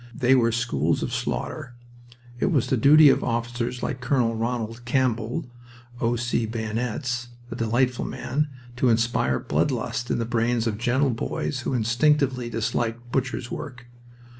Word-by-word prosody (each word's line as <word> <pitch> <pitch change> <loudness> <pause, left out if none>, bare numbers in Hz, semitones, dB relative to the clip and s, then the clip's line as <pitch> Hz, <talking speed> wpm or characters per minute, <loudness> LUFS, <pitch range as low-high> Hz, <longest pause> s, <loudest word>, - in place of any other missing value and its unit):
They 130 -3 +3
were 120 -3 +4
schools 115 +1 0
of - - -3
slaughter. 120 - -3 0.6
It - - +2
was 145 -9 +2
the - - +1
duty 145 +5 +7
of - - +3
officers 120 +1 -2
like 130 -3 -3
Col. 125 -2 +1
Ronald 115 0 -3
Campbell 120 +2 0 0.5
"O.C. 120 -1 0
Bayonets" 120 +2 -3 0.2
(a - - -4
delightful 120 +2 +1
man) 145 +4 -2 0.3
to 125 0 +3
inspire 115 - +2
blood - - 0
lust 120 -1 -3
in - - +1
the 115 - -1
brains 115 0 0
of 110 -2 -2
gentle 130 +3 +2
boys 125 +4 -3
who 130 +1 -2
instinctively 125 +2 +2
disliked 115 +1 -2
butcher's 130 -2 -2
work. 125 -3 -7
120 Hz, 145 wpm, -25 LUFS, 115-130 Hz, 0.6 s, duty